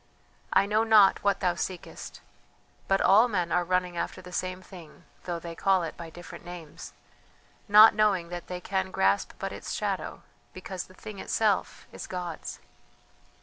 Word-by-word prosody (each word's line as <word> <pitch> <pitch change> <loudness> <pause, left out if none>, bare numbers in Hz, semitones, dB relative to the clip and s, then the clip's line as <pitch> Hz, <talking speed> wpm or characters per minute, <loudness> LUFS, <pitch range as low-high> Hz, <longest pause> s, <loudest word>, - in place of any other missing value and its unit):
I - - +4
know 215 +2 +2
not 215 -3 +5
what 200 -1 +1
thou 180 -2 +2
seekest, 180 0 -6 0.7
but 195 0 +2
all 215 +5 +6
men 180 -7 -1
are 180 - +2
running 180 0 -1
after - - -3
the 180 -1 -11
same 185 +1 -3
thing, 175 -5 -13 0.2
though 175 -1 -2
they 170 0 -7
call 190 +1 +2
it 165 - -5
by 170 -1 -8
different 175 +2 -11
names, 175 -3 -10 0.7
not 210 +2 +9
knowing 200 -5 +2
that 175 0 -7
they 180 0 -5
can 190 0 -2
grasp 100 - +1
but - - -4
its - - -6
shadow, - - -3 0.3
because 185 0 -6
the 185 - -18
thing 205 +1 -9
itself 210 -2 0
is - - -8
God's. 175 -3 -6
185 Hz, 165 wpm, -28 LUFS, 175-195 Hz, 0.7 s, not